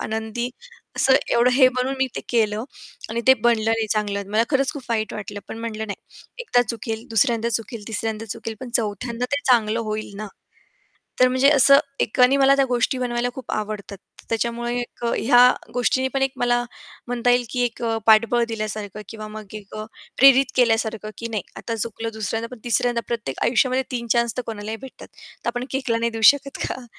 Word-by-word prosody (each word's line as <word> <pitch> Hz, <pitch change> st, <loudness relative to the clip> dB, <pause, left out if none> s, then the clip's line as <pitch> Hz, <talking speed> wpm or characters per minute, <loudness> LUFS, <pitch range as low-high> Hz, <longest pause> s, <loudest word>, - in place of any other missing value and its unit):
आनंदी 220 Hz, +2 st, -3 dB, 0.5 s
असं 265 Hz, -, +4 dB, 0.2 s
एवढं 240 Hz, +1 st, +4 dB
हे 260 Hz, 0 st, +6 dB
बनून 260 Hz, +2 st, -1 dB
मी 265 Hz, -, +2 dB
ते -, -, -2 dB
केलं 220 Hz, -1 st, +1 dB, 0.5 s
आणि 235 Hz, +1 st, -1 dB
ते 260 Hz, -, +8 dB
बनलं 230 Hz, -2 st, +3 dB
नाही 225 Hz, -1 st, 0 dB
चांगलं, 200 Hz, -2 st, -2 dB
मला 220 Hz, +2 st, +3 dB
खरंच 275 Hz, -1 st, +2 dB
खूप 285 Hz, -3 st, -8 dB
वाईट 215 Hz, -2 st, -1 dB
वाटलं. 205 Hz, -1 st, -6 dB
पण -, -, -7 dB
म्हटलं 220 Hz, -1 st, -4 dB
नाही 200 Hz, -, -7 dB, 0.4 s
एकदा 245 Hz, -, +3 dB
चुकेल, 225 Hz, 0 st, -4 dB
दुसऱ्यांदा 230 Hz, +1 st, +2 dB
चुकेल, 225 Hz, -2 st, -3 dB
तिसऱ्यांदा 220 Hz, 0 st, -3 dB
चुकेल, 225 Hz, +2 st, -5 dB
पण 255 Hz, -2 st, -7 dB
चौथ्यांदा 230 Hz, +2 st, -3 dB
ते 285 Hz, -, +1 dB
चांगलं 230 Hz, -2 st, +3 dB
होईल 215 Hz, -2 st, -4 dB
ना! 215 Hz, +1 st, -5 dB, 0.9 s
तर 255 Hz, -, +7 dB
म्हणजे 260 Hz, +2 st, +4 dB
असं 275 Hz, 0 st, +7 dB, 0.2 s
एकानी 250 Hz, +4 st, +3 dB
मला 275 Hz, 0 st, +5 dB
त्या 275 Hz, -1 st, +3 dB
गोष्टी 245 Hz, +1 st, 0 dB
बनवायला 245 Hz, -1 st, -1 dB
खूप 265 Hz, -, -7 dB
आवडतात. 210 Hz, -1 st, -4 dB, 0.3 s
त्याच्यामुळे 235 Hz, +1 st, -2 dB
एक 240 Hz, 0 st, -8 dB
अ, 235 Hz, -, +1 dB
ह्या 245 Hz, +1 st, +5 dB, 0.3 s
गोष्टीनी 255 Hz, +2 st, +1 dB
पण 270 Hz, -, 0 dB
एक 270 Hz, 0 st, +1 dB
मला 240 Hz, 0 st, +1 dB, 0.4 s
म्हणता 245 Hz, 0 st, 0 dB
येईल, 245 Hz, 0 st, +3 dB
की 250 Hz, -, -1 dB
एक 240 Hz, -1 st, -3 dB
अ, 225 Hz, -1 st, 0 dB
पाठबळ 230 Hz, +2 st, +5 dB
दिल्यासारखं 215 Hz, -2 st, -5 dB
किंवा 215 Hz, -1 st, -8 dB
मग 215 Hz, -2 st, -10 dB
एक 205 Hz, -2 st, -10 dB
अ, 215 Hz, -, -5 dB, 0.3 s
प्रेरित 270 Hz, 0 st, +6 dB
केल्यासारखं, 225 Hz, -3 st, +1 dB
की 230 Hz, -, -4 dB
नाही 215 Hz, -5 st, -3 dB
आता 230 Hz, -, -4 dB
चुकलं 225 Hz, +1 st, -3 dB
दुसऱ्यांदा 225 Hz, +1 st, -3 dB
पण 225 Hz, -, -18 dB
तिसऱ्यांदा 240 Hz, 0 st, +2 dB
प्रत्येक 225 Hz, -, -4 dB
आयुष्यामध्ये 255 Hz, +2 st, +2 dB
3 235 Hz, -2 st, -4 dB
चान्स 235 Hz, -1 st, 0 dB
तर -, -, 0 dB
कोणालाही 220 Hz, 0 st, -5 dB
भेटतात. 265 Hz, -1 st, -11 dB, 0.4 s
तर -, -, +2 dB
आपण 245 Hz, +1 st, -4 dB
केकला 265 Hz, -4 st, -1 dB
नाही 230 Hz, 0 st, -1 dB
देऊ 225 Hz, 0 st, -5 dB
शकत 280 Hz, -1 st, -8 dB
का? 255 Hz, -, -6 dB
230 Hz, 190 wpm, -22 LUFS, 220-250 Hz, 0.9 s, ते